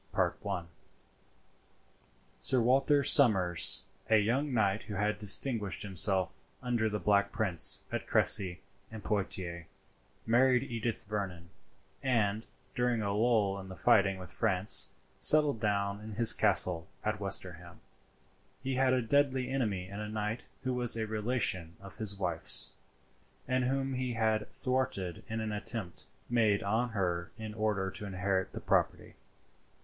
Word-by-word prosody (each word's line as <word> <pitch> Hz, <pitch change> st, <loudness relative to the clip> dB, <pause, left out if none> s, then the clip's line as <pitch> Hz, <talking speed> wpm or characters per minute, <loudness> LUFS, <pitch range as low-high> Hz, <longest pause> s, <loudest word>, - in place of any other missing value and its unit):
"* -, -, -38 dB, 2.3 s
[Sir 130 Hz, -, +2 dB
Walter 135 Hz, +4 st, +2 dB
Somers, 95 Hz, -, +6 dB, 0.2 s
a 110 Hz, -, +5 dB
young 125 Hz, +8 st, -1 dB
knight 105 Hz, -3 st, 0 dB
who 105 Hz, -, -7 dB
had 105 Hz, +2 st, -2 dB
distinguished 105 Hz, 0 st, +2 dB
himself 95 Hz, -1 st, +1 dB, 0.2 s
under 120 Hz, -3 st, -1 dB
the 105 Hz, -, -3 dB
Black 100 Hz, -1 st, +1 dB
Prince 100 Hz, -7 st, +3 dB
at -, -, -5 dB
Crecy 95 Hz, -3 st, +4 dB, 0.3 s
and 110 Hz, -1 st, -10 dB
Poitiers, 90 Hz, -4 st, -4 dB, 0.6 s
married 125 Hz, +2 st, +2 dB
Edith 115 Hz, -3 st, -4 dB
Vernon; 95 Hz, -4 st, -6 dB, 0.5 s
and, 110 Hz, -4 st, -1 dB, 0.3 s
during 125 Hz, -2 st, -1 dB
a 100 Hz, -1 st, -2 dB
lull 105 Hz, -3 st, 0 dB
in 95 Hz, 0 st, -11 dB
the 95 Hz, -, -9 dB
fighting 100 Hz, -2 st, +2 dB
with 90 Hz, -2 st, -7 dB
France, 100 Hz, -2 st, +3 dB, 0.3 s
settled 150 Hz, -6 st, +4 dB
down 100 Hz, -1 st, -2 dB
in 110 Hz, 0 st, -9 dB
his 115 Hz, +2 st, +6 dB
castle 90 Hz, -5 st, +2 dB, 0.2 s
at 105 Hz, -1 st, -3 dB
Westerham. 90 Hz, -4 st, -4 dB, 0.8 s
He 135 Hz, 0 st, -3 dB
had 130 Hz, -1 st, +2 dB
a 125 Hz, -1 st, 0 dB
deadly 130 Hz, +1 st, 0 dB
enemy 105 Hz, -9 st, -3 dB
in 100 Hz, +2 st, -9 dB
a 105 Hz, 0 st, -6 dB
knight 105 Hz, +2 st, -5 dB, 0.2 s
who 130 Hz, -1 st, -2 dB
was 120 Hz, -2 st, -1 dB
a 110 Hz, -, -2 dB
relation 105 Hz, -6 st, -2 dB
of 100 Hz, 0 st, -13 dB
his 110 Hz, -3 st, 0 dB
wife's, 85 Hz, -4 st, +2 dB, 0.7 s
and 130 Hz, 0 st, -1 dB
whom 135 Hz, +1 st, -2 dB
he 125 Hz, -1 st, -3 dB
had 110 Hz, -2 st, -1 dB
thwarted 125 Hz, -, -3 dB
in 110 Hz, +1 st, -5 dB
an 110 Hz, -1 st, -4 dB
attempt 105 Hz, -3 st, -6 dB, 0.2 s
made 110 Hz, -4 st, +1 dB
on 110 Hz, +5 st, -1 dB
her 90 Hz, -5 st, -3 dB
in 110 Hz, -1 st, -8 dB
order 105 Hz, -3 st, -2 dB
to 105 Hz, -, -6 dB
inherit 95 Hz, 0 st, -3 dB
the -, -, -7 dB
property. -, -, -1 dB
105 Hz, 140 wpm, -30 LUFS, 95-120 Hz, 2.3 s, Somers